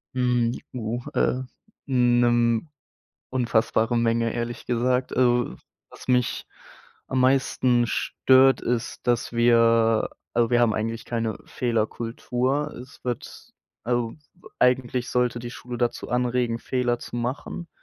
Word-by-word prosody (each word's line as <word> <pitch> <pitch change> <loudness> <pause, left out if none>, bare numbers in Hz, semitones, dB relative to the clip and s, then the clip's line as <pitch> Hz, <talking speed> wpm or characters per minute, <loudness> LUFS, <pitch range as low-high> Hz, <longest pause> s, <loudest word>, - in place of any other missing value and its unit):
Mhm, 125 -2 +1 0.2
oh, 120 0 -3
äh, 130 - +1 0.4
mhm, 120 -2 +3
'ne 155 - -17 0.6
unfassbare 120 -2 +1
Menge, 115 0 +1
ehrlich 120 -1 -4
gesagt. 125 +1 0
Also 120 - +2 0.3
was - - -14
mich 125 -1 +1 0.6
am 130 - -1
meisten 130 -2 +3
stört, 130 +2 +3
ist, 120 +1 -3
dass 120 -1 +1
wir 115 -1 +4 0.2
also 120 0 +2
wir 120 0 +4
haben 115 -3 +3
eigentlich 115 +1 -3
keine 115 -2 -2
Fehlerkultur. 120 +4 -1
Es 130 - -16
wird 125 -2 -6 0.3
also 120 -1 -1 0.4
eigentlich 125 0 +1
sollte 125 -1 +1
die 120 0 -6
Schule 125 0 -7
dazu 120 -1 -2
anregen, 125 -1 0
Fehler 120 -1 -1
zu 120 - -8
machen. 130 +7 -4
120 Hz, 120 wpm, -25 LUFS, 115-125 Hz, 0.6 s, wir